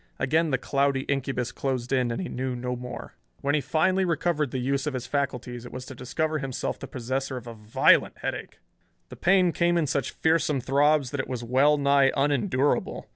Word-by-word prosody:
Again 160 +5 +1
the 135 - +1
cloudy 140 +1 +1
incubus 135 -3 -2
closed 130 -2 -3
in 125 -2 +2
and 115 - -3
he 185 - -3
knew 130 0 -3
no 125 +1 -3
more. 125 0 -8 0.3
When 140 - 0
he 150 - +2
finally 185 +6 +1
recovered 165 -4 0
the 130 - -4
use 135 +3 -1
of 145 - -2
his 125 -1 -4
faculties 125 -3 -3
it 120 - -10
was 125 0 -7
to 135 - -9
discover 155 +5 -2
himself 135 -3 -3
the - - -7
possessor 130 +1 -3
of 120 - -8
a 120 - -7
violent 105 0 +3
headache. - - -5 0.5
The - - -9
pain 185 0 +3
came 170 +1 +2
in 165 - +2
such 140 0 -1
fearsome 160 -3 +1
throbs 140 +1 +2
that 145 - -4
it - - -2
was 125 -2 -4
well 135 +5 +3
nigh 140 -1 +4
unendurable. 145 0 0
135 Hz, 200 wpm, -26 LUFS, 125-150 Hz, 0.5 s, nigh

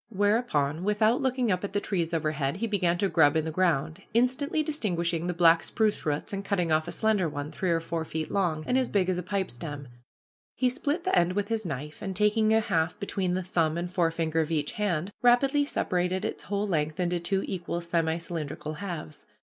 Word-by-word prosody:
Whereupon, 200 - +1
without 215 +4 +2
looking 255 -3 +1
up 180 +1 0
at 200 - -4
the 205 - +2
trees 175 -5 -1
overhead, 155 -3 -1
he 215 +5 -2
began 185 -5 +1
to 200 +2 +1
grub 160 -4 +4
in 160 - 0
the 160 - -2
ground, 165 0 0
instantly 260 +6 +2
distinguishing 175 - -1
the 180 - 0
black 165 -1 +6
spruce 215 -6 0
roots, 150 +6 -2
and 195 0 -3
cutting 180 -5 0
off 155 0 +2
a - - -4
slender 210 -6 +1
one, 145 +1 -5
three 185 - -2
or 165 -1 +3
four 165 0 -3
feet 160 0 -4
long, 175 -6 0
and 255 +1 +2
as 255 - 0
big 190 -3 +1
as 180 -1 0
a - - -4
pipestem, 155 -7 -4 0.7
he 255 0 +2
split 290 +7 -1
the 375 0 +1
end 175 +1 +3
with 205 +2 -1
his 220 -4 -1
knife, 150 +1 -6
and 195 -2 -4
taking 215 +1 +3
a 220 0 +4
half 180 -3 0
between 190 -3 -1
the 185 - -1
thumb 165 -3 0
and 175 +1 -3
forefinger 165 -2 0
of 155 - -2
each 150 -3 -1
hand, 195 -3 -1
rapidly 270 +4 +4
separated 180 -7 -1
its - - -4
whole 200 0 -1
length 155 -5 -1
into 175 -1 0
two 190 +3 0
equal 170 -2 -3
semi 170 -1 0
cylindrical 155 -2 -5
halves. 160 -5 -7
180 Hz, 210 wpm, -28 LUFS, 160-210 Hz, 0.7 s, black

